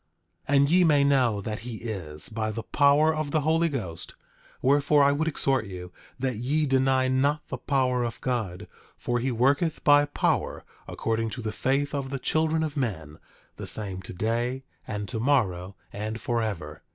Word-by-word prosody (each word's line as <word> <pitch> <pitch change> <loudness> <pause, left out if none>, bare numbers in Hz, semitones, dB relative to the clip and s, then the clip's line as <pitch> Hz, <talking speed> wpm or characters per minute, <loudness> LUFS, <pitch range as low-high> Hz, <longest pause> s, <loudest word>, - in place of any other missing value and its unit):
10:7 145 - +3
And 140 +1 +4
ye 180 +1 +5
may 150 -4 +4
know 130 -7 +2
that 105 +1 -4
he 120 0 -7
is, 85 -10 -4
by 110 0 -2
the 110 +1 -4
power 145 +2 +4
of 155 -1 -2
the 155 +1 +1
Holy 165 +3 +2
Ghost; 95 - -6 0.4
wherefore 145 +2 +4
I 140 - +5
would 155 +3 0
exhort 135 -5 +1
you 90 -1 -8 0.3
that 130 -3 -2
ye 145 +7 0
deny 130 -1 +2
not 140 +3 +1
the - - -4
power 130 -3 +1
of 115 -1 -4
God; 110 -9 -3 0.3
for 120 0 -1
he 130 +2 -1
worketh 140 +7 +1
by 145 0 +6
power, 145 - -1 0.2
according 115 0 -1
to 120 - -6
the 110 - -2
faith 135 +6 0
of 140 -2 -2
the 135 - -3
children 160 +4 +1
of 155 -2 -3
men, 80 - -3 0.4
the - - -6
same 95 -4 -3
today 115 +7 -2 0.2
and 105 -1 -4
tomorrow, 100 -5 0 0.2
and 110 +2 -4
forever. 110 -6 -3
130 Hz, 175 wpm, -26 LUFS, 110-145 Hz, 0.4 s, by